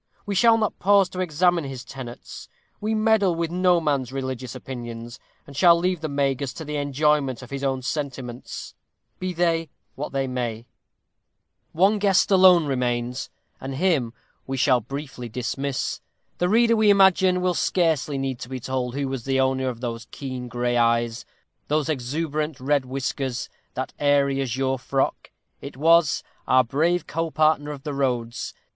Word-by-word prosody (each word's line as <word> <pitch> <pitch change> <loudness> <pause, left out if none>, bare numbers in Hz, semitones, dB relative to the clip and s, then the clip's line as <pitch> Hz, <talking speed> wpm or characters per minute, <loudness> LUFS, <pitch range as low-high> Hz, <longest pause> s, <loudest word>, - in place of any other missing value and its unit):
We 205 - -2
shall 225 +4 +5
not 215 -2 -1
pause 200 -1 +4
to 185 - -7
examine 175 0 +2
his 135 -2 -7
tenets; 130 -3 -9 0.3
we 215 +1 -1
meddle 215 -4 +3
with 165 0 -2
no 180 0 +3
man's 140 -6 -1
religious 130 -2 -4
opinions, 120 -2 -7 0.3
and 140 - -13
shall 170 +3 +6
leave 180 -1 0
the 155 - -3
Magus 140 -1 -1
to 160 - -8
the 150 0 -4
enjoyment 145 -2 +1
of 125 - -12
his 140 0 -4
own 135 -1 -1
sentiments, 130 -4 -5 0.5
be 185 0 -2
they 165 -2 0 0.2
what 145 - -5
they 135 -1 0
may. 120 -3 -3 1.1
One 195 +6 +3
guest 200 0 +3
alone 185 -3 +7
remains, 125 -1 -2 0.3
and 135 0 -5
him 145 -8 +1 0.3
we 135 0 -3
shall 130 -2 +3
briefly 135 0 -7
dismiss. 130 +3 -3 0.4
The 180 - +2
reader, 230 +2 +4
we 215 -1 +4
imagine, 190 -2 +5
will 180 0 +1
scarcely 160 -3 +1
need 135 -2 -3
to 120 - -8
be 130 -1 -4
told 125 0 -3
who 140 -1 -1
was 130 -3 -4
the 135 0 +1
owner 130 0 +1
of 120 -1 -7
those 115 -2 -5
keen 130 -3 -6
gray 120 0 -1
eyes; 115 0 +1 0.4
those 150 +1 0
exuberant 150 +2 -2
red 140 +1 +1
whiskers; 130 -1 -3 0.3
that - - -4
airy 140 -1 +2
azure 130 0 -1
frock. 135 +1 -1 0.3
It 140 -2 -9
was 165 0 +4 0.2
Our 130 0 +5
brave 160 +8 +1
co 165 +1 -2
partner 155 -1 +2
of 145 -2 -7
the 150 - -4
roads. 125 -4 -2
140 Hz, 165 wpm, -24 LUFS, 130-170 Hz, 1.1 s, alone